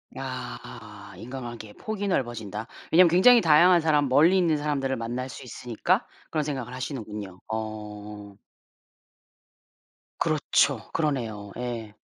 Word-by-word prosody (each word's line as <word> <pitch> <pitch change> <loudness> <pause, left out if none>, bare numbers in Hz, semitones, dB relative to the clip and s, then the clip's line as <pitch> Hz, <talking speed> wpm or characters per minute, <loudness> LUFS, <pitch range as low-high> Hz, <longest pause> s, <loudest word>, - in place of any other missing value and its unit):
아 - - -8
인간관계의 120 -3 -8
폭이 210 -2 -4
넓어진다. 115 - -2 0.2
왜냐하면 175 +1 +7
굉장히 230 +8 +7
다양한 170 +2 +6
사람, 150 -3 +2
멀리 160 +8 +5
있는 170 -4 +3
사람들을 140 -3 -1
만날 120 +3 -4
수 - - -9
있으니까 120 -2 -1 0.2
그런 155 - 0
생각을 130 -5 -4
하시는군요. 105 -8 -6
어. 105 -2 -6 1.8
그렇죠. - - +1
그러네요. 115 -10 -2
예. 115 -4 -5
125 Hz, 290 characters per minute, -26 LUFS, 110-155 Hz, 1.8 s, 왜냐하면